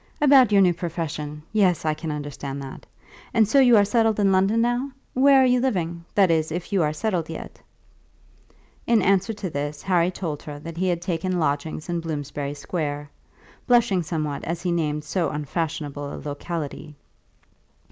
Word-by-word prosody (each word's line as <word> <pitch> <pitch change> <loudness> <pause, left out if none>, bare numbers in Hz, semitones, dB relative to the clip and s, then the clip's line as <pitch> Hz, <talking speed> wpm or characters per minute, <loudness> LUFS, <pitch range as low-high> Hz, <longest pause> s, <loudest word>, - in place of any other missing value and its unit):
"About 270 -6 +6
your 200 -1 +6
new 180 -1 +4
profession. 155 -3 -5
Yes, 185 -6 +2
I 155 - +2
can 155 +1 -6
understand 145 -2 -5
that. 135 - -10 0.5
And 220 -2 +5
so 275 +6 +4
you 245 -4 +6
are 205 - +5
settled 225 0 +2
in 200 -1 +3
London 195 +4 +3
now? 240 +3 0 0.2
Where 270 +1 +6
are - - +5
you 250 0 +3
living; 175 -9 -1
that 195 -4 +5
is, 160 -1 +1
if 175 +4 -5
you 195 - +3
are 150 -1 +2
settled 170 0 -2
yet?" 165 - -8 1.3
In 230 -4 +4
answer 195 +3 +2
to 205 -2 -5
this, 145 -2 -4
Harry 180 -2 +2
told 165 -5 -5
her 150 -1 -8
that 165 +3 -9
he 185 +2 0
had 175 -1 -1
taken 180 0 -1
lodgings 150 0 -2
in 175 -1 -1
Bloomsbury 145 -3 -4
Square, 145 -1 -4 0.6
blushing 235 -7 +4
somewhat 150 -3 -3
as 170 +1 -4
he 180 - 0
named 150 -3 -1
so 165 +3 -1
unfashionable 150 -1 -4
a - - -6
locality. 150 0 -6
170 Hz, 175 wpm, -24 LUFS, 150-200 Hz, 1.3 s, About